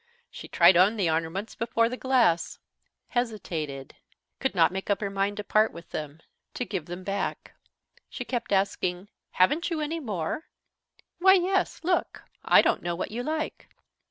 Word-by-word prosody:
She - - -9
tried 180 - +6
on 200 +5 +4
the 180 -6 +1
ornaments 165 +6 -2
before 230 0 +1
the 245 - -4
glass, 245 -11 +2 0.5
hesitated, 165 - -3 0.5
could 265 -6 -1
not 170 -1 +4
make 190 +1 -5
up 200 - +2
her 200 -2 -3
mind 195 +1 -1
to 210 - -3
part 215 +1 +3
with 170 0 -12
them, 150 +1 -6 0.3
to 250 - -2
give 185 -9 -4
them 175 +2 -7
back. 195 +1 -3 0.6
She 245 - -6
kept 240 -4 -3
asking: 190 -1 0 0.2
"Haven't 300 - +2
you 330 -2 -2
any 310 +2 -2
more?" 210 - -3 0.7
"Why, 380 +2 +7
yes. 380 +1 0
Look. 360 +2 -1 0.2
I - - +6
don't - - +1
know 175 0 -2
what 175 - -4
you 235 +3 -3
like." 310 +4 -4
205 Hz, 165 wpm, -27 LUFS, 175-250 Hz, 0.7 s, Why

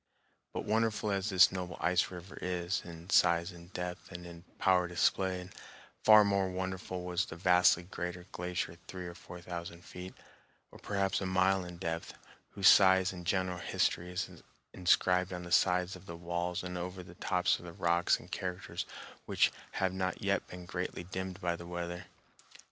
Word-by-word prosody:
But - - -4
wonderful 110 -1 +1
as 100 +1 0
this 95 -2 +7
noble 90 -2 -5
ice 90 0 +2
river 90 +1 -9
is 90 0 -1
in 85 +2 -10
size 85 0 +4
and 85 +1 -13
depth 90 0 -5
and 90 -1 -8
in 85 -1 -10
power 90 -2 +3
displayed, 90 +1 0 0.5
far 110 -1 +9
more 100 -2 +2
wonderful 95 0 -4
was 90 +1 0
the - - -8
vastly 90 0 +4
greater 90 0 -5
glacier 90 -1 -3
three 90 -1 -6
or 85 - -6
four 90 0 -11
thousand 85 0 -7
feet, 90 +1 -9 0.6
or - - -13
perhaps 100 -1 0
a 95 - -1
mile, 95 +1 +3
in 90 -1 -8
depth, 85 -2 -4 0.3
whose 100 -2 +2
size 95 -1 +7
and 90 -2 -8
general 90 -1 0
history 90 0 0
is 90 0 -4 0.3
inscribed 90 0 +3
on 90 0 -5
the 85 - -9
sides 90 +1 +3
of 95 - -14
the 85 - -7
walls 85 +1 -2
and 90 -1 -4
over 90 +1 -5
the 85 - -12
tops 90 0 +1
of - - -12
the 85 - -7
rocks 85 0 +2
in - - -13
characters 90 0 -4 0.4
which - - +3 0.2
have 95 -1 0
not 95 +1 -2
yet 100 0 +1
been 90 0 -9
greatly 90 0 -4
dimmed 95 +1 -5
by 85 -2 0
the 85 0 -9
weather. 85 +1 -5
90 Hz, 175 wpm, -32 LUFS, 85-95 Hz, 0.6 s, far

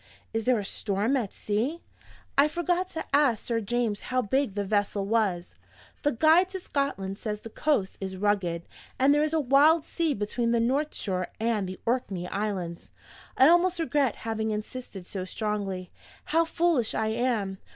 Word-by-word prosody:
Is 225 0 -1
there 250 -1 +4
a 205 - -3
storm 205 +6 0
at 230 -7 -1
sea? 240 +11 -2 0.5
I 280 +2 +6
forgot 350 +3 -1
to 320 - -5
ask 275 -7 +3
Sir 230 -1 0
James 225 -1 -1
how 255 0 +1
big 260 0 0
the 205 -1 -1
vessel 205 0 0
was. 200 -5 0 0.5
The 290 - +2
'Guide 320 +8 +4
to 380 0 -5
Scotland' 220 - -2
says 210 -2 -4
the 225 - -9
coast 255 -11 0
is 190 -1 -4
rugged; 185 -4 0 0.3
and 270 +2 +5
there 295 - +3
is 305 0 +1
a 320 - +3
wild 295 +4 +5
sea 330 -4 0
between 230 +3 -1
the 235 - +3
north 275 +6 0
shore 185 -3 -2
and 220 -4 0
the 185 - -7
Orkney 205 -7 -1
Islands. 190 -5 -3 0.5
I 265 - +7
almost 350 +2 +4
regret 290 -6 +1
having 220 -1 -1
insisted 215 -2 -5
so 185 0 -5
strongly 195 -2 -3 0.3
how 330 +1 +2
foolish 325 -8 +1
I 220 0 0
am! 220 -5 -1
225 Hz, 170 wpm, -27 LUFS, 200-285 Hz, 0.5 s, I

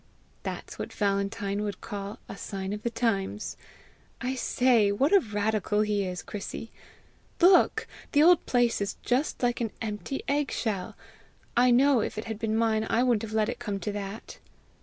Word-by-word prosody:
"That's - - -6
what - - -4
Valentine 200 0 -1
would 205 -2 -3
call 200 -1 -6
a - - -7
sign 195 0 -5
of 210 - -5
the 235 - -1
times. 215 -3 -1 0.6
I 255 +1 -2
say, 245 -4 +3
what 275 - +2
a 400 - +8
radical 210 - 0
he 210 -2 +1
is, 180 -1 -4
Chrissy! 215 +2 -6 0.7
Look! 360 +1 +5 0.3
the 290 0 +5
old 350 +1 +6
place 240 -3 +2
is 200 - -2
just 255 +2 0
like 245 0 +1
an 225 - 0
empty 220 +5 -4
egg 285 0 +1
shell! 205 -5 -3 0.6
I 250 +1 +5
know, 255 0 +5
if 210 - -3
it 215 - -4
had 220 -2 -5
been 220 -1 0
mine, 220 -1 +1
I 235 - +3
wouldn't 240 -4 +2
have 220 -1 -6
let 215 -1 +2
it - - -4
come 205 -5 -3
to 210 - -3
that!" 205 +1 -7
220 Hz, 180 wpm, -28 LUFS, 205-245 Hz, 0.7 s, a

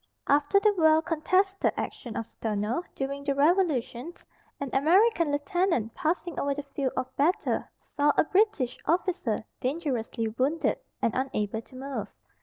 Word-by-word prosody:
After 290 +7 +4
the 420 +1 +3
well 315 0 +5
contested 375 +5 +1
action 235 -2 -5
of 225 - -2
Stono, 215 +6 -2
during 275 +1 -3
the 280 -1 0
revolution, 295 -3 +1 0.5
an 280 -2 -4
American 335 +3 +4
lieutenant, 290 - 0
passing 335 0 -2
over 280 0 0
the 290 - -4
field 275 -2 -3
of 260 0 -3
battle, 320 +7 +1 0.2
saw 290 +1 +1
a - - +6
British 370 - +1
officer 340 - 0
dangerously 255 -5 -2
wounded, 265 +9 0 0.2
and 230 - +2
unable 220 -5 -2
to 255 - -18
move. 260 -5 -4
285 Hz, 140 wpm, -28 LUFS, 255-340 Hz, 0.5 s, a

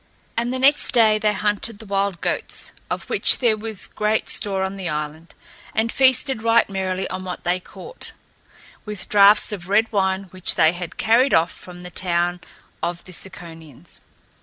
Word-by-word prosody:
And 235 +1 -1
the 260 - -2
next 275 +3 +4
day 220 -3 +4
they 210 0 +2
hunted 210 +2 -1
the 220 - -11
wild 195 -3 -1
goats, - - -3 0.2
of - - -4
which - - +4
there 235 -4 +2
was 215 -2 -5
great 215 +1 -1
store 195 -2 -2
on 190 +1 -3
the 190 -3 -4
island, 150 +2 -5 0.4
and 225 +1 +1
feasted 265 -2 +3
right 230 0 +3
merrily 190 -1 -2
on 185 0 -5
what 180 -1 -6
they 180 +1 0
caught, - - -11 0.7
with 210 -4 -7
draughts 205 +1 +6
of 185 -3 -7
red 220 +3 +3
wine 190 -2 0
which 185 -1 -1
they 160 - +5
had 175 -1 -7
carried 240 +5 +3
off 165 +2 +2
from 180 -1 -12
the 180 - -9
town 175 0 -1 0.4
of 170 +1 -3
the 185 - -12
Ciconians. 165 -6 -10
195 Hz, 175 wpm, -21 LUFS, 180-220 Hz, 0.7 s, draughts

